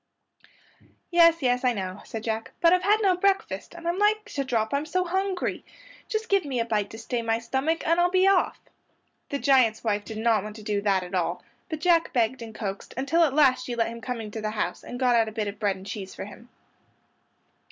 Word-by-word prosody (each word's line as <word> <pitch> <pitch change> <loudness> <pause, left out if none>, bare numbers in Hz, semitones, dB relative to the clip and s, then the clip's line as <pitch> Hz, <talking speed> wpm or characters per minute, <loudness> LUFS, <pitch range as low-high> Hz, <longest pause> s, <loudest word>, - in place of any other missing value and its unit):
"Yes, 335 -2 +5
yes, 250 0 +2
I 250 -1 +3
know"; 190 -2 -5
said 220 -1 -6
Jack, 225 0 -3
"but 335 0 +5
I've 365 - +3
had 415 +4 +3
no 380 -2 +4
breakfast, 390 -1 -1
and 340 0 -7
I'm 345 +3 0
like 425 +1 +2
to 280 - -1
drop 230 -3 -1
I'm 285 +2 -1
so 365 +3 0
hungry. 380 +1 -2 0.4
Just 445 -1 -2
give 395 -2 +3
me 270 -4 -3
a 230 - +1
bite 210 -3 -1
to 220 - -9
stay 240 +1 -3
my 225 0 0
stomach 270 +7 -1
and 335 +2 +3
I'll 350 0 +4
be 370 +1 +3
off." 390 -2 +3 0.7
The 280 - -1
giant's 255 -6 +3
wife 210 -2 0
did 220 +1 -8
not 220 -1 +2
want 210 0 -7
to 215 - -10
do 205 -1 -1
that 195 -2 +1
at 180 +1 -10
all, 175 -1 -1 0.3
but 315 -2 -4
Jack 335 -1 +3
begged 245 0 +1
and 225 -1 -9
coaxed 195 -3 -6
until 305 +6 +2
at 285 -4 +1
last 265 -4 +4
she 245 - -4
let 230 -1 +1
him 230 0 -8
come 250 0 -4
into 220 0 -6
the 215 - -2
house 215 0 -3
and 245 - -7
got 250 -2 +3
out 225 -1 +3
a - - -10
bit 215 -1 -2
of 200 0 -6
bread 200 -2 +1
and 190 0 -12
cheese 195 -1 -7
for - - -6
him. 230 +4 -13
245 Hz, 235 wpm, -26 LUFS, 215-335 Hz, 0.7 s, Yes